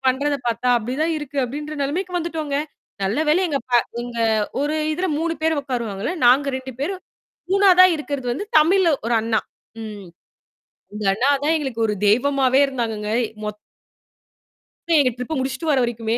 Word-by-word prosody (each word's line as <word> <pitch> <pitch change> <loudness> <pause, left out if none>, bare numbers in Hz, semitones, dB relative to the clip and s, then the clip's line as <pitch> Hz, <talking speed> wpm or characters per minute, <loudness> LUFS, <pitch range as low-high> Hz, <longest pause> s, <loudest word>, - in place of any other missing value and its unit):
பண்றத 280 +3 +1
பாத்தா, 235 +1 0
அப்டிதான் 265 +9 -1
இருக்கு 290 -1 -9
அப்டின்ற 295 +5 -6
நெலமைக்கு 350 +7 -2
வந்துட்டோங்க. 315 -4 -3 0.5
நல்ல 195 +6 0
வேலை 320 +5 +4
எங்க 285 -3 0
ப - - -10 0.3
எங்க 240 0 -7 0.4
ஒரு 295 +2 0 0.2
இதுல 360 +4 -1
3 330 +1 -1
பேரு 320 0 +2
உக்காருவாங்கல்ல! 235 - -3
நாங்க 265 +4 +5
2 260 0 -7
பேரு, 355 +8 -1 0.6
3 380 -2 +6
இருக்கிறது 285 -4 -5
வந்து 290 +12 -4
தமிழு 335 +2 +4
ஒரு 235 - +1
அண்ணா. 225 0 0 0.4
ம். 210 -3 -8 0.9
இந்த 210 0 -5
அண்ணா 240 +8 +1 0.2
தான் 315 +2 +3
எங்களுக்கு 260 -7 -2
ஒரு 210 - -1
தெய்வமாவே 265 +4 +3
இருந்தாங்கங்க 225 -6 -3 0.4
மொத்த 210 0 -8 1.3
எங்க 260 -3 +3
ட்ரிப்ப 250 +5 -3
முடிச்சுட்டு 265 +4 -2
வர 275 - +3
வரைக்குமே. 230 -1 -2
270 Hz, 150 wpm, -21 LUFS, 235-305 Hz, 1.3 s, 3